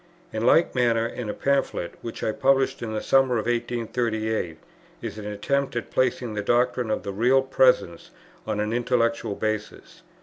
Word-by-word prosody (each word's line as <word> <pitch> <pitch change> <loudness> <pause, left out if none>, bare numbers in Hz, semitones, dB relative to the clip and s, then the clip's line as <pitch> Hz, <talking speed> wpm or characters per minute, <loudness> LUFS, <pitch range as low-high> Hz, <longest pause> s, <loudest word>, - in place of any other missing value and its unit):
In 110 +2 0
like 165 +6 +4
manner 115 -2 +2
in 115 -1 -5
a - - -2
Pamphlet, 135 -10 0
which 115 - -7
I - - +1
published 135 +3 +2
in 115 -2 -4
the 110 - -3
summer 135 -2 +3
of 110 - -2
1838, 115 -5 -1 0.4
is - - -6
an 105 - -6
attempt 135 +7 -1
at 120 - -4
placing 125 -2 0
the 105 - -2
doctrine 120 +2 +1
of 110 - -1
the 100 - -4
Real 125 +6 +3
Presence 125 -10 +2 0.4
on 105 -1 -1
an 105 +1 -1
intellectual 115 -3 0
basis. 110 0 -4
115 Hz, 170 wpm, -25 LUFS, 110-125 Hz, 0.4 s, like